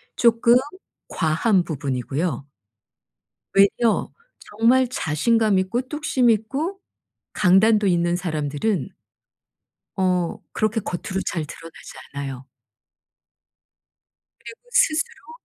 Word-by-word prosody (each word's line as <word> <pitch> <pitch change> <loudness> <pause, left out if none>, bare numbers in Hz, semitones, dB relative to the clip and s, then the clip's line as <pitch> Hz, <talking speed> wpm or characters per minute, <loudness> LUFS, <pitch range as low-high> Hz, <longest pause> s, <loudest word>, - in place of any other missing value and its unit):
쪼끔 235 0 +4 0.5
과한 175 +4 +1
부분이고요. 140 0 -3 1.1
외려 205 +3 +3 0.3
정말 240 +4 +2
자신감 215 +2 +1
있고 200 +7 -1
뚝심 260 -3 +1
있고 275 - -1 0.5
강단도 210 +3 +4
있는 175 -1 +2
사람들은 155 +1 -2 1.1
어 180 -2 0
그렇게 215 +1 0
겉으로 185 0 -4
잘 170 -5 -2
드러나지 165 +2 -11 0.2
않아요. 135 -2 -6 2.0
그리고 460 - -10
스스로 325 -1 +1
195 Hz, 200 characters per minute, -22 LUFS, 165-230 Hz, 2.0 s, 쪼끔